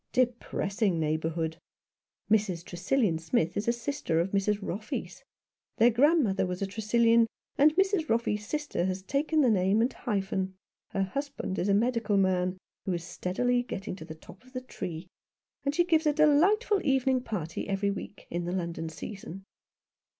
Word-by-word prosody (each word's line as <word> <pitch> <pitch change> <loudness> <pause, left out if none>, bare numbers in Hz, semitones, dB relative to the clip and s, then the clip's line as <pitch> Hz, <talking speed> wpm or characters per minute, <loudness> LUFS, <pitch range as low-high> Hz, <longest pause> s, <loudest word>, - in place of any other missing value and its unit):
" - - -53
Depressing 220 -6 0
neighbourhood! 160 +1 -1 0.2
" - - -65
" - - -23
Mrs. 195 -6 +1
Tresillian 185 0 0
Smith 165 0 0
is 205 - -2
a - - +5
sister 235 - -1
of 175 +3 0
Mrs. 200 +1 +1
Roffey's. 210 +2 -5 0.5
Their 235 +2 +6
grandmother 245 - +3
was 180 0 -3
a - - +2
Tresillian, 230 +3 +3 0.3
and 300 +2 +5
Mrs. 385 -3 +2
Roffey's 225 -2 +1
sister 295 - -2
has 185 0 -2
taken 300 +7 +1
the 250 -5 +4
name 195 +1 +3
and 240 +3 +2
hyphen. 195 -4 -2 0.3
Her 195 - 0
husband 275 -1 -3
is 190 - 0
a 200 - +4
medical 225 -2 +1
man 185 -1 +2 0.3
who 190 - +1
is 170 -1 -3
steadily 245 +8 0
getting 200 -5 -5
to 160 - -8
the 155 - -8
top 180 +6 -15
of 255 +1 -20
the 255 - -3
tree, 175 -9 -6 0.6
and 280 +1 -1
she 345 - +4
gives 320 -2 +3
a 300 - +4
delightful 360 +8 +4
evening 265 -1 +2
party 180 -7 -4
every 200 +1 +1
week, 200 0 -7
in 175 0 -2
the 175 - -2
London 170 -3 -3
season." 195 +2 -8
210 Hz, 170 wpm, -29 LUFS, 185-255 Hz, 0.6 s, Their